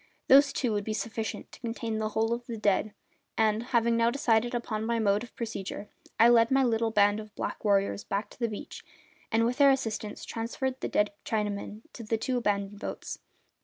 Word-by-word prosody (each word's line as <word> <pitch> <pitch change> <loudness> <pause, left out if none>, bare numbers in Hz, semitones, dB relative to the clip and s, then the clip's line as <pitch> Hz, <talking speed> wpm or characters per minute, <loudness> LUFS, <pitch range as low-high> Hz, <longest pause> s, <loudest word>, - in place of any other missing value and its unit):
Those 275 +1 +7
two 245 -4 -1
would 205 -1 -1
be 215 +1 -3
sufficient 225 0 -4
to - - -13
contain 230 -2 -3
the 215 0 -1
whole 225 +2 0
of 235 0 -5
the 230 -2 -5
dead; 210 0 +1 0.5
and, 220 0 +2
having 235 -1 +1
now 230 0 +3
decided 240 -2 +1
upon 220 -2 -3
my 230 +1 0
mode 205 -2 +2
of 240 - -10
procedure, 210 -3 -5 0.3
I 230 - +8
led 230 -1 +5
my 270 0 +4
little 230 -2 +1
band 205 -1 +3
of 215 -1 -10
black - - -4
warriors 200 -1 +2
back 200 +2 -3
to - - -16
the 235 - +1
beach 210 - -8 0.5
and, 225 0 +3
with 245 +3 -1
their 280 -1 +7
assistance, 220 -6 -2
transferred 255 +3 -3
the - - -2
dead 210 0 +2
Chinamen 210 0 -3
to - - -8
the 225 0 -1
two 250 +3 -1
abandoned 205 -3 -1
boats. - - -6
225 Hz, 200 wpm, -29 LUFS, 210-235 Hz, 0.5 s, I